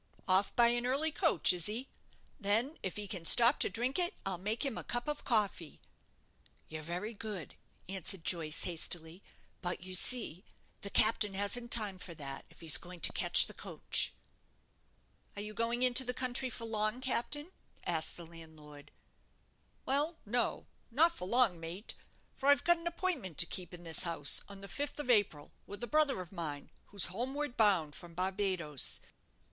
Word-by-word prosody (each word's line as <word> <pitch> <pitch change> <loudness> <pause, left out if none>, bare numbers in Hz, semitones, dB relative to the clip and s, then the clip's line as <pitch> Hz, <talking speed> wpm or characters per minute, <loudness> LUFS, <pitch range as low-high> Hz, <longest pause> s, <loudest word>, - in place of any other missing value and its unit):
"Off 190 +2 +2
by 235 -1 +6
an 240 +1 0
early 290 +5 0
coach, 325 - +3
is 175 -2 0
he? 235 +6 -3 0.5
Then, 225 +8 0
if 190 - -4
he 210 -1 -5
can 185 -4 -5
stop 235 - +8
to - - +3
drink 250 +7 -1
it, 355 +3 +2
I'll 190 -2 -3
make 215 +8 -1
him 270 -5 -1
a - - -5
cup 240 +2 -3
of 295 0 -3
coffee." 205 - -1 0.9
"You're 155 0 -7
very 180 +8 -5
good," 210 -5 -7 0.3
answered 190 -1 -3
Joyce, 160 -4 0
hastily; 170 0 0 0.4
"but 175 -1 -3
you 185 0 -8
see, 190 -3 0 0.4
the 200 - -6
captain 215 -1 +2
hasn't 235 +5 0
time 205 -5 +1
for 170 -2 -9
that, 135 -3 -7
if - - -18
he's 155 -5 +6
going 180 0 -11
to - - +2
catch - - +5
the - - -8
coach." - - 0 1.2
"Are 205 - -5
you 210 0 -7
going 235 +3 0
into 255 +1 +5
the 250 -1 -3
country 255 0 -2
for 230 -1 -5
long, 215 +1 -1
captain?" 280 +5 -2 0.3
asked 160 -2 -1
the 170 - -8
landlord. 155 -3 -13 1.0
"Well, 295 +5 0
no; 240 +3 -1 0.2
not 315 +8 +4
for 180 - -5
long, 230 -6 +3
mate; 170 +6 -6 0.4
for 275 - 0
I've 285 - +5
got 345 0 +3
an 335 - -6
appointment 340 - -3
to - - +7
keep 180 0 -5
in 175 -1 -10
this 165 -1 -1
house, 165 -5 +2
on 200 -1 -10
the 200 - -9
fifth 285 +7 -4
of 255 -4 0
April, 200 -10 +1 0.2
with 205 +4 -8
a - - 0
brother 295 -6 +2
of 180 - -10
mine, 155 -6 -6 0.2
who's 200 -2 0
homeward 260 +8 -3
bound 185 -9 +3
from 170 +1 -11
Barbadoes. 185 -6 +1
205 Hz, 175 wpm, -33 LUFS, 175-245 Hz, 1.2 s, stop